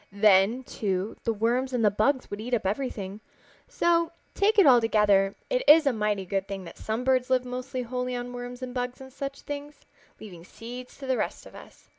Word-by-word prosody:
Then, 205 Hz, +4 st, +4 dB
too, 195 Hz, -3 st, -3 dB
the 230 Hz, -, +2 dB
worms 240 Hz, +4 st, 0 dB
and 235 Hz, -3 st, +1 dB
the 205 Hz, -, +5 dB
bugs 255 Hz, +6 st, 0 dB
would 205 Hz, +1 st, -5 dB
eat 245 Hz, +2 st, -1 dB
up 215 Hz, -, -3 dB
everything. 205 Hz, -2 st, -3 dB, 0.5 s
So, 335 Hz, -1 st, +1 dB, 0.2 s
take 420 Hz, +2 st, +2 dB
it 400 Hz, -, +7 dB
all 250 Hz, -4 st, +7 dB
together, 205 Hz, -3 st, +3 dB
it -, -, 0 dB
is 310 Hz, +1 st, +8 dB
a 275 Hz, -, +3 dB
mighty 210 Hz, -3 st, -1 dB
good 195 Hz, +1 st, -2 dB
thing 195 Hz, -1 st, -5 dB
that 170 Hz, -, -11 dB
some 220 Hz, +3 st, -3 dB
birds 255 Hz, 0 st, +2 dB
live 255 Hz, -1 st, +2 dB
almost 250 Hz, +1 st, -6 dB
wholly 250 Hz, 0 st, -3 dB
on 245 Hz, 0 st, -5 dB
worms 245 Hz, +1 st, -7 dB
and 250 Hz, -1 st, -5 dB
bugs 250 Hz, 0 st, -3 dB
and 265 Hz, -1 st, -12 dB
such 275 Hz, 0 st, -6 dB
things, 290 Hz, 0 st, -7 dB, 0.4 s
leaving 190 Hz, -6 st, -10 dB
the 165 Hz, -, -15 dB
seeds 245 Hz, +5 st, -10 dB
to 275 Hz, -, -8 dB
the 260 Hz, -1 st, 0 dB
rest -, -, -3 dB
of -, -, -13 dB
us. -, -, -15 dB
245 Hz, 215 wpm, -27 LUFS, 210-260 Hz, 0.5 s, is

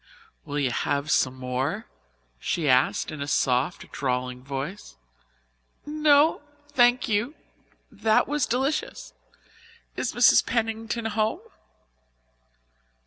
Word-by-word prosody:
"Will 145 Hz, -, -4 dB
you 135 Hz, -4 st, +1 dB
have 145 Hz, +4 st, -1 dB
some 130 Hz, -1 st, +2 dB
more?" 130 Hz, -, -3 dB, 0.5 s
she 160 Hz, -, -2 dB
asked 130 Hz, -1 st, +2 dB
in 150 Hz, -, -7 dB
a 140 Hz, -, -3 dB
soft, 130 Hz, +3 st, 0 dB
drawling 125 Hz, -1 st, -3 dB
voice. 135 Hz, -, -6 dB, 0.9 s
"No, 300 Hz, 0 st, +3 dB, 0.3 s
thank 245 Hz, -3 st, +3 dB
you. 225 Hz, +7 st, 0 dB, 0.6 s
That 220 Hz, -1 st, +2 dB
was 295 Hz, -2 st, 0 dB
delicious. 270 Hz, +6 st, -2 dB, 0.8 s
Is -, -, -2 dB
Mrs. -, -, +6 dB
Pennington 225 Hz, 0 st, -2 dB
home?" 220 Hz, -, -1 dB
205 Hz, 100 wpm, -25 LUFS, -, 0.9 s, Mrs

